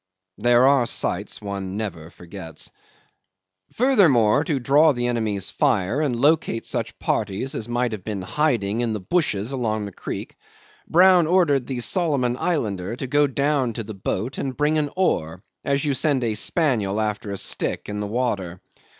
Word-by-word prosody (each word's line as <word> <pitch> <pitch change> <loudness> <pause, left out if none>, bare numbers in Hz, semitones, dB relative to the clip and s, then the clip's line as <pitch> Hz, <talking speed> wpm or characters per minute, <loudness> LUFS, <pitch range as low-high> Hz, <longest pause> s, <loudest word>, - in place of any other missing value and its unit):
There 120 +1 +4
are 135 -4 +4
sights 100 -2 -1
one 100 -1 -4
never 90 -7 -5
forgets. 85 -2 -7 1.0
'Furthermore, 160 - +4
to 145 -3 0
draw 145 +5 +4
the 120 -1 -2
enemy's 110 -5 -1
fire 100 +10 +1
and 140 -5 0
locate 145 -5 +2
such - - -3
parties 105 +5 -2
as 115 +1 -4
might 120 0 0
have 105 -4 -6
been 100 -3 -4
hiding 115 -4 0
in 115 -2 -1
the 105 - -3
bushes 110 - -1
along 110 -5 -2
the 100 - -7
creek, - - -7 0.5
Brown 180 -1 +5
ordered 155 -8 +2
the 130 -3 -3
Solomon 140 -6 +1
Islander 110 - -1
to 135 - -5
go 145 +3 +3
down 140 -2 0
to 115 - -4
the 110 +1 -8
boat 105 +5 -3
and 130 -2 -4
bring 150 +1 +2
an 145 -1 -1
oar, 90 - -1 0.2
as 140 0 0
you 145 - +1
send 135 0 +1
a 115 -2 0
spaniel 110 - 0
after 105 -1 -2
a 100 - -4
stick - - -2
into 105 0 -4
the 105 - -3
water. 100 -6 -2
120 Hz, 165 wpm, -23 LUFS, 105-145 Hz, 1.0 s, Brown